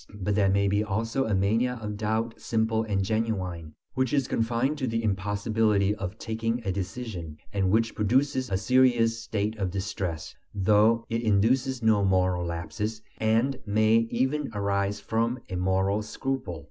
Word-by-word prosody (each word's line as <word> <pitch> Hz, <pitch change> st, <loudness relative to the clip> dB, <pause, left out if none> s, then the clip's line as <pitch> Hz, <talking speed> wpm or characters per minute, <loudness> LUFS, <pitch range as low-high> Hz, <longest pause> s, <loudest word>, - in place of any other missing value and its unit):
But 105 Hz, 0 st, -1 dB
there 100 Hz, -1 st, +3 dB
may 100 Hz, +1 st, +2 dB
also 115 Hz, +5 st, -1 dB
be -, -, -3 dB
a 105 Hz, -, +2 dB
mania 115 Hz, +6 st, +1 dB
of 105 Hz, -1 st, -5 dB
doubt 110 Hz, +2 st, -2 dB
simple 110 Hz, 0 st, 0 dB
and 100 Hz, -3 st, -1 dB
genuine, 95 Hz, -7 st, -2 dB, 0.2 s
which 130 Hz, 0 st, 0 dB
is 140 Hz, -3 st, +2 dB
confined 120 Hz, +6 st, 0 dB
to 130 Hz, -, -1 dB
the 115 Hz, 0 st, -1 dB
impossibility 105 Hz, 0 st, +1 dB
of 100 Hz, 0 st, -5 dB
taking 115 Hz, +1 st, -2 dB
a 95 Hz, -, 0 dB
decision, 95 Hz, -4 st, -5 dB, 0.2 s
and 95 Hz, -2 st, +1 dB
which 115 Hz, +3 st, +2 dB
produces 130 Hz, +4 st, +1 dB
a 95 Hz, -, +1 dB
serious 115 Hz, +1 st, +3 dB
state 110 Hz, -1 st, -2 dB
of 95 Hz, -2 st, 0 dB
distress, 95 Hz, -3 st, -4 dB, 0.2 s
though 110 Hz, +3 st, +3 dB
it 115 Hz, 0 st, -1 dB
induces 120 Hz, +4 st, +2 dB
no 110 Hz, -2 st, +4 dB
moral 90 Hz, -2 st, +2 dB
lapses, 105 Hz, +6 st, -4 dB, 0.2 s
and 115 Hz, +5 st, +1 dB
may 110 Hz, +2 st, +4 dB
even 135 Hz, +5 st, 0 dB
arise 100 Hz, 0 st, 0 dB
from 115 Hz, +4 st, -1 dB
a 95 Hz, -, -4 dB
moral 95 Hz, +3 st, +1 dB
scruple. 110 Hz, -, -4 dB
110 Hz, 160 wpm, -27 LUFS, 100-115 Hz, 0.2 s, no